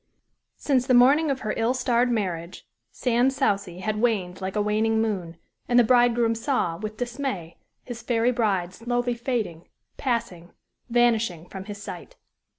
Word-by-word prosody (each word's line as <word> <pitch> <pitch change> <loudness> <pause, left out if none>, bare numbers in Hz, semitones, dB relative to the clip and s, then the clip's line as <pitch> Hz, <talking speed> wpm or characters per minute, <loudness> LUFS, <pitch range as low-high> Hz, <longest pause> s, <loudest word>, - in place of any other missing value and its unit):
Since 260 -3 +1
the 255 - +4
morning 280 +6 +5
of 270 -1 -1
her 215 - -2
ill 230 +3 +1
starred 245 -1 +2
marriage, 185 -7 -3 0.2
Sans 250 +2 +1
Souci 200 -9 -1
had 215 +2 -2
waned 195 -6 0
like 190 +1 -4
a 210 - +2
waning 220 +1 +1
moon; 185 -7 -2 0.3
and 240 - +3
the 245 - +7
bridegroom 240 -1 +3
saw, 230 - -1
with 215 +2 -6
dismay, 240 - -4 0.3
his 240 -2 -7
fairy 235 +1 +1
bride 195 -7 0
slowly 245 +3 -1
fading, 230 -9 -3 0.3
passing, 200 -9 -3 0.4
vanishing 230 -8 +1
from 190 -1 -8
his 205 -1 -8
sight. - - -9
230 Hz, 155 wpm, -25 LUFS, 195-245 Hz, 0.4 s, the